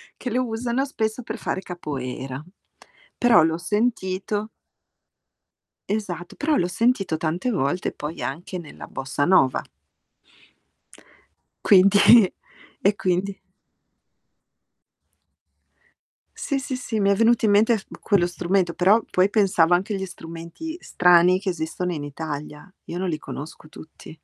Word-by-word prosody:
che 250 Hz, -, -5 dB
lo 250 Hz, +2 st, 0 dB
usano 235 Hz, +3 st, -2 dB
spesso 220 Hz, -2 st, -3 dB
per -, -, -6 dB
fare 190 Hz, -, -3 dB
Capoeira. 135 Hz, -6 st, -6 dB, 0.7 s
Però 240 Hz, -7 st, +5 dB
l'ho 160 Hz, 0 st, +1 dB
sentito 205 Hz, +1 st, -2 dB, 1.4 s
esatto, 180 Hz, -5 st, -4 dB
però 300 Hz, +1 st, 0 dB
l'ho 175 Hz, -, +1 dB
sentito 195 Hz, -4 st, 0 dB
tante 165 Hz, +9 st, -2 dB
volte, 180 Hz, -, -1 dB
poi 150 Hz, +3 st, -7 dB
anche 175 Hz, +6 st, -5 dB
nella 160 Hz, -4 st, -10 dB
Bossa 135 Hz, +2 st, -3 dB
Nova. 160 Hz, -8 st, +4 dB, 2.0 s
Quindi 200 Hz, +2 st, +6 dB, 0.5 s
e 200 Hz, 0 st, +3 dB
quindi 190 Hz, +1 st, -1 dB, 3.0 s
Sì, 280 Hz, -, -2 dB
sì, 270 Hz, -1 st, -4 dB
sì, 230 Hz, -3 st, -3 dB
mi 200 Hz, -1 st, +2 dB
è -, -, +3 dB
venuto 230 Hz, +2 st, +3 dB
in 205 Hz, -, +3 dB
mente 220 Hz, +3 st, +4 dB
f 195 Hz, -, -12 dB, 0.2 s
quello 200 Hz, -5 st, +2 dB
strumento, 175 Hz, 0 st, 0 dB
però 200 Hz, +5 st, +4 dB
poi 185 Hz, +2 st, +3 dB
pensavo 185 Hz, -5 st, +3 dB
anche 190 Hz, +4 st, +1 dB
agli 190 Hz, -1 st, -3 dB
strumenti 170 Hz, -, -8 dB
strani 180 Hz, -, +4 dB
che 195 Hz, 0 st, -3 dB
esistono 175 Hz, +1 st, -3 dB
in 150 Hz, -3 st, -5 dB
Italia. 150 Hz, +3 st, -7 dB
Io 170 Hz, -, -6 dB
non 185 Hz, 0 st, -2 dB
li 155 Hz, -, -2 dB
conosco 155 Hz, 0 st, -9 dB
tutti. 155 Hz, +1 st, -13 dB
185 Hz, 125 wpm, -23 LUFS, 165-215 Hz, 3.0 s, Quindi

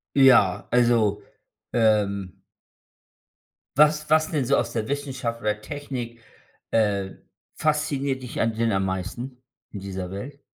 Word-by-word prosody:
Ja, 125 Hz, -9 st, +5 dB
also, 120 Hz, -4 st, +3 dB, 0.5 s
ähm 100 Hz, -5 st, +1 dB, 1.4 s
was 150 Hz, +1 st, +5 dB
was 155 Hz, 0 st, +4 dB
denn 145 Hz, -4 st, +1 dB
so 140 Hz, -, +3 dB
aus -, -, -1 dB
der 110 Hz, -2 st, -2 dB
Wissenschaft 130 Hz, -5 st, -3 dB
oder 105 Hz, 0 st, -1 dB
Technik, 125 Hz, -3 st, -6 dB, 0.5 s
äh, 100 Hz, -3 st, +1 dB, 0.4 s
fasziniert 140 Hz, -4 st, 0 dB
dich 125 Hz, -, -4 dB
an 115 Hz, -1 st, +1 dB
denn 115 Hz, 0 st, +1 dB
am 95 Hz, 0 st, +1 dB
meisten, 95 Hz, +8 st, -4 dB, 0.3 s
in 100 Hz, -, -6 dB
dieser 95 Hz, -2 st, -5 dB
Welt? 130 Hz, +9 st, -7 dB
115 Hz, 125 wpm, -25 LUFS, 100-140 Hz, 1.4 s, Ja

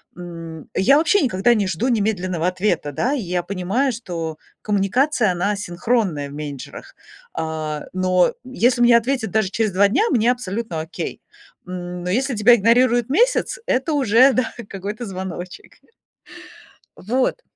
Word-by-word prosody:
М, 165 Hz, -2 st, -9 dB
я 275 Hz, +9 st, +5 dB
вообще 330 Hz, +5 st, +3 dB
никогда 240 Hz, -2 st, +2 dB
не 200 Hz, -3 st, 0 dB
жду 190 Hz, +8 st, -1 dB
немедленного 185 Hz, -6 st, 0 dB
ответа, 180 Hz, -5 st, -1 dB
да. 240 Hz, -, -1 dB
Я 180 Hz, -9 st, -2 dB
понимаю, 200 Hz, +8 st, -1 dB
что 165 Hz, -9 st, -5 dB, 0.3 s
коммуникация- 215 Hz, +3 st, +1 dB
она 180 Hz, +4 st, 0 dB
асинхронная 190 Hz, -5 st, -1 dB
в 140 Hz, -, -11 dB
менеджерах. 145 Hz, -3 st, -8 dB, 0.4 s
А, 155 Hz, -1 st, -4 dB
но 185 Hz, -1 st, +2 dB
если 250 Hz, -1 st, +1 dB
мне 240 Hz, -1 st, +7 dB
ответят 240 Hz, -1 st, -1 dB
даже 220 Hz, -4 st, +1 dB
через 215 Hz, 0 st, 0 dB
2 200 Hz, +2 st, +4 dB
дня, 315 Hz, -, +2 dB
мне 240 Hz, -1 st, +3 dB
абсолютно 215 Hz, -7 st, -4 dB
окей. 160 Hz, +3 st, -6 dB, 0.5 s
М, 180 Hz, -1 st, -6 dB
но 180 Hz, -, -3 dB
если 255 Hz, +6 st, 0 dB
тебя 225 Hz, +3 st, +6 dB
игнорируют 240 Hz, +2 st, +3 dB
месяц, -, -, +1 dB
это 265 Hz, +5 st, 0 dB
уже, 260 Hz, 0 st, +5 dB
да, 255 Hz, -3 st, -1 dB, 0.2 s
какой-то 205 Hz, +4 st, -5 dB
звоночек. 185 Hz, -2 st, -7 dB, 1.2 s
Вот. 255 Hz, -, -1 dB
205 Hz, 140 wpm, -21 LUFS, 180-245 Hz, 1.2 s, мне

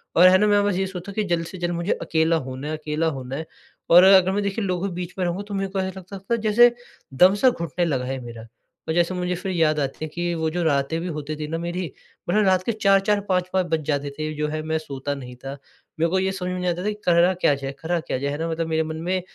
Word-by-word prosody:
और 180 Hz, +2 st, +8 dB
है 185 Hz, +1 st, +7 dB
ना 210 Hz, -, +3 dB
मैं 205 Hz, -1 st, +4 dB
बस 205 Hz, -, +1 dB
ये 190 Hz, +1 st, 0 dB
सोचूँ 190 Hz, +1 st, -7 dB
कि 215 Hz, -, 0 dB
जल्द 170 Hz, -3 st, -1 dB
से 185 Hz, -, -9 dB
जल्द 175 Hz, 0 st, -2 dB
मुझे 170 Hz, +4 st, 0 dB
अकेला 160 Hz, +1 st, +2 dB
होना 130 Hz, +3 st, -6 dB
है 155 Hz, -, -3 dB
अकेला 155 Hz, +1 st, -1 dB
होना 130 Hz, +1 st, -6 dB
है 160 Hz, +2 st, -4 dB, 0.4 s
और 175 Hz, +2 st, +8 dB
अगर 190 Hz, -1 st, +6 dB
मैं 205 Hz, +1 st, 0 dB
देखिए 200 Hz, +1 st, -2 dB
लोगों 185 Hz, +1 st, -1 dB
के 180 Hz, -, -5 dB
बीच 180 Hz, 0 st, -5 dB
में 185 Hz, -, +1 dB
रहूँगा 175 Hz, +3 st, -2 dB
तो 205 Hz, -, -7 dB
मेरे 195 Hz, 0 st, -2 dB
को 195 Hz, -, -2 dB
ऐसा 190 Hz, 0 st, -3 dB
लगता 190 Hz, +2 st, -9 dB
था 195 Hz, +5 st, -1 dB
जैसे 240 Hz, +3 st, +6 dB, 0.4 s
दम-सा 195 Hz, -, +5 dB
घुटने 170 Hz, -, -2 dB
लगा 130 Hz, -6 st, -1 dB
है 130 Hz, +1 st, -3 dB
मेरा। 115 Hz, -1 st, -9 dB, 0.4 s
और 160 Hz, -, 0 dB
जैसे 175 Hz, +2 st, +2 dB
मुझे 180 Hz, 0 st, -2 dB
फिर 190 Hz, +2 st, -4 dB
याद 155 Hz, -3 st, +2 dB
आती 135 Hz, -2 st, -2 dB
है 155 Hz, -, -7 dB
कि 175 Hz, 0 st, -2 dB
वो 160 Hz, -1 st, -1 dB
जो 175 Hz, +2 st, -2 dB
रातें 145 Hz, +1 st, +1 dB
भी 180 Hz, -, -4 dB
होती 155 Hz, -2 st, -4 dB
थी 150 Hz, 0 st, -5 dB
न 165 Hz, +2 st, -3 dB
मेरी 175 Hz, -2 st, -3 dB, 0.4 s
मतलब 210 Hz, +2 st, +3 dB
रात 185 Hz, -1 st, +3 dB
के 235 Hz, -, 0 dB
4-4, 200 Hz, -1 st, +3 dB
5-5 185 Hz, -1 st, 0 dB
बज 160 Hz, -1 st, +1 dB
जाते 145 Hz, -2 st, -1 dB
थे 155 Hz, 0 st, -2 dB
जो 150 Hz, 0 st, -1 dB
है 155 Hz, +1 st, -3 dB
मैं 160 Hz, 0 st, -1 dB
सोता 145 Hz, -2 st, -4 dB
नहीं 125 Hz, -2 st, -9 dB
था। 135 Hz, +3 st, -8 dB, 0.4 s
मेरे 165 Hz, +1 st, +2 dB
को 190 Hz, +2 st, +1 dB
ये 190 Hz, 0 st, 0 dB
समझ 180 Hz, -1 st, -4 dB
में 180 Hz, -, -3 dB
नहीं 180 Hz, -, -2 dB
आता 175 Hz, +1 st, -2 dB
था -, -, -2 dB
कि -, -, -1 dB
करा 175 Hz, +1 st, +4 dB
क्या 180 Hz, -5 st, +2 dB
जाए 135 Hz, 0 st, -5 dB
करा 170 Hz, +1 st, -1 dB
क्या 155 Hz, -, -3 dB
जाए? 140 Hz, +2 st, -2 dB
है 145 Hz, -, -3 dB
ना? 165 Hz, +1 st, -2 dB
मतलब 165 Hz, 0 st, -2 dB
मेरे 160 Hz, 0 st, +1 dB
मन 160 Hz, 0 st, -5 dB
में 185 Hz, +2 st, -1 dB
175 Hz, 280 wpm, -23 LUFS, 155-190 Hz, 0.4 s, और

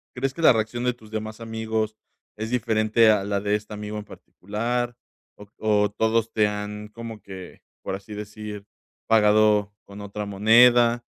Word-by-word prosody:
crees 135 Hz, +1 st, -1 dB
que 165 Hz, -, -7 dB
la 160 Hz, -, +7 dB
reacción 115 Hz, +2 st, -2 dB
de 125 Hz, -, +2 dB
tus 110 Hz, -3 st, -17 dB
demás 110 Hz, 0 st, -5 dB
amigos 110 Hz, -1 st, -3 dB, 0.4 s
es 110 Hz, +1 st, -5 dB
diferente 110 Hz, -2 st, +3 dB
a 105 Hz, -2 st, +1 dB
la 100 Hz, 0 st, -1 dB
de 100 Hz, +1 st, -1 dB
este 105 Hz, 0 st, -5 dB
amigo 105 Hz, 0 st, -6 dB
en 105 Hz, -, -9 dB
particular 120 Hz, +6 st, -4 dB, 0.4 s
o 105 Hz, -, -13 dB
o 105 Hz, -1 st, +2 dB
todos 110 Hz, +1 st, 0 dB
te 105 Hz, -1 st, +3 dB
han 105 Hz, 0 st, -5 dB
como 115 Hz, -1 st, -9 dB
que, 95 Hz, -2 st, -11 dB, 0.2 s
por -, -, -4 dB
así 100 Hz, +2 st, -9 dB
decir, 105 Hz, 0 st, -7 dB, 0.4 s
pagado 105 Hz, -1 st, +4 dB
con 100 Hz, +1 st, -11 dB
otra 100 Hz, +1 st, -5 dB
moneda, 120 Hz, +4 st, +5 dB
110 Hz, 165 wpm, -24 LUFS, 105-115 Hz, 0.4 s, la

